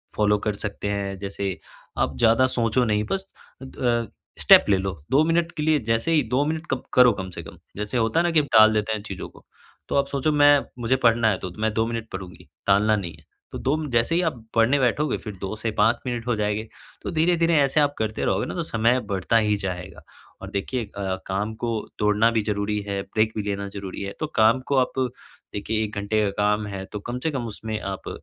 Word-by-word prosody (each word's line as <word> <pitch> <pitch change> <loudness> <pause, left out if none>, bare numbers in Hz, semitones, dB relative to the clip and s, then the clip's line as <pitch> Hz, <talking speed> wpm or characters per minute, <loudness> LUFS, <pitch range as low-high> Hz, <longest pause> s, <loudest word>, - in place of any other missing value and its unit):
Follow 105 -1 +3
कर 105 - +1
सकते 100 0 -5
हैं, 100 -1 -2
जैसे 100 -1 -4 0.4
आप 70 -2 0
ज़्यादा 115 - +4
सोचो 120 0 +1
नहीं 105 -1 +1
बस 195 0 -1 0.4
अ, 120 -3 -1 0.3
स्टेप - - +8
ले 100 - +4
लो, 95 0 -2 0.2
2 145 +4 +5
मिनट 165 +1 +1
के 150 - -1
लिए 155 -1 +3
जैसे 115 +8 +1
ही 155 -2 +4
2 135 +3 +3
मिनट 160 +1 -2
कब 130 - -1
करो 125 -1 +7
कम 95 - -6
से - - -8
कम, - - -12 0.2
जैसे 105 +4 -2
होता 115 +7 +2
है - - +3
ना 175 - +1
कि 160 - +5
हम 150 - 0
टाल 110 0 +8
देते 110 +1 0
हैं 105 - -3
चीज़ों 95 -3 -6
को, - - -19 0.4
तो - - -1
आप 140 0 +2
सोचो 140 +2 0
मैं 145 -1 +6 0.2
मुझे 120 +2 +1
पढ़ना 115 -1 +4
है 95 - 0
तो 90 - -6
मैं 110 0 0
2 110 +1 +1
मिनट 115 -1 -4
पढ़ूँगी, 95 -1 -9 0.2
टालना 105 +2 +4
नहीं 90 -5 -4
है। - - -20 0.3
तो - - -5
2 135 +3 0
म 155 -1 -4
जैसे 120 +8 +2
ही 175 - +3
आप 140 -10 -2
पढ़ने 115 +5 +4
बैठोगे 135 +3 +1
फिर 105 -3 -8
2 100 +2 -3
से 110 +1 -3
5 115 +3 +3
मिनट 120 -2 -3
हो 120 - +1
जाएँगे, 105 +1 -1 0.3
तो - - -4
धीरे-धीरे 165 0 +2
ऐसे 140 +1 +3
आप 145 -1 +2
करते 110 0 -2
रहोगे 95 - +1
न - - -6
तो 170 - -1
समय 120 -2 +2
बढ़ता 100 +4 +1
ही 105 -2 +2
जाएगा। 90 -1 -6 0.4
और - - -7
देखिए 115 +5 -2
अ, 100 -2 -4
काम 100 +3 -2
को 120 +1 -3 0.3
तोड़ना 105 +2 +3
भी 110 -1 +1
ज़रूरी 105 0 -1
है, 100 -1 -2
ब्रेक 110 0 0
भी 105 - -1
लेना 100 -1 -3
ज़रूरी 100 -1 -7
है, 100 - -5
तो 155 - -1
काम 115 +3 +5
को 140 - +1
आप 130 -1 +2 0.6
देखिए 110 +2 -1
1 105 0 -5
घंटे 105 +1 0
का 100 - +1
काम 105 0 +1
है, 100 -1 -5
तो 105 - -7
कम 120 +4 -5
से 160 - 0
कम 130 -4 -3
उसमें 110 0 -5
आप 95 -1 -5
110 Hz, 235 wpm, -24 LUFS, 100-130 Hz, 0.6 s, स्टेप